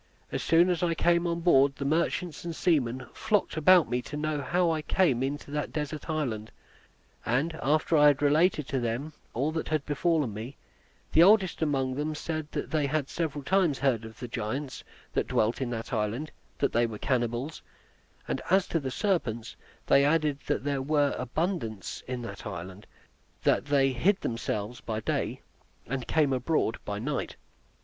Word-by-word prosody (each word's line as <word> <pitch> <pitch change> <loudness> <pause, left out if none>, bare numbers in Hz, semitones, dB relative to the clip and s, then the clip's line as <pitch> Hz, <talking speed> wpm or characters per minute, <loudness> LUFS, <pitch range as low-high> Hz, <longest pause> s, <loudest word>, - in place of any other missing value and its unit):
As - - -2
soon 170 +3 +4
as 175 - -1
I 170 -2 +1
came 170 +1 +2
on 170 0 -1
board, 140 -5 +4
the 140 - -5
merchants 165 +2 0
and 170 -1 -4
seamen 130 -8 +1
flocked 215 -2 0
about 170 +2 +6
me 125 +2 -1
to 145 +5 -7
know 150 -1 -1
how 175 +4 +1
I 160 -1 -1
came 150 -6 +2
into 140 +1 -3
that 150 0 -2
desert 150 +1 -4
island; 120 -9 -2 0.7
and 135 +8 0
after 155 +3 +2
I 150 -1 +7
had 145 -2 +4
related 150 0 +3
to 135 - 0
them 120 +6 -3 0.2
all 140 +6 0
that 160 0 -3
had 155 -2 -1
befallen 150 -4 +1
me, 115 +6 -7 0.5
the 160 - +6
oldest 190 -1 +5
among 135 -4 +1
them 150 +3 -2
said 155 -1 -4
they 150 0 -1
had 145 -1 -1
several 150 -4 -3
times 180 -3 +2
heard 125 -4 +1
of 110 0 -11
the 125 - -5
giants 125 +4 -4 0.3
that - - 0
dwelt 110 +5 +1
in 130 - -1
that 115 -1 -5
island, 115 +7 -1 0.3
that 140 - 0
they 120 +1 +3
were 110 -2 -6
cannibals; 120 +4 -1 0.7
and - - -2
as 190 +1 +4
to 165 - +1
the 135 -3 -4
serpents, 130 - -1 0.3
they 140 - +5
added 150 -1 +2
that - - 0
there 140 -1 -1
were 145 0 +2
abundance 125 - -3
in 125 -1 -4
the 115 - -6
island; 95 0 -7 0.6
that - - +2
they 140 -2 +3
hid 185 +11 +2
themselves 115 0 -3
by 110 -1 -3
day - - -2 0.4
and 130 0 -4
came 150 -4 +2
abroad 130 -2 0
by 100 -1 -3
night. 135 +6 -3
145 Hz, 175 wpm, -28 LUFS, 125-160 Hz, 0.7 s, I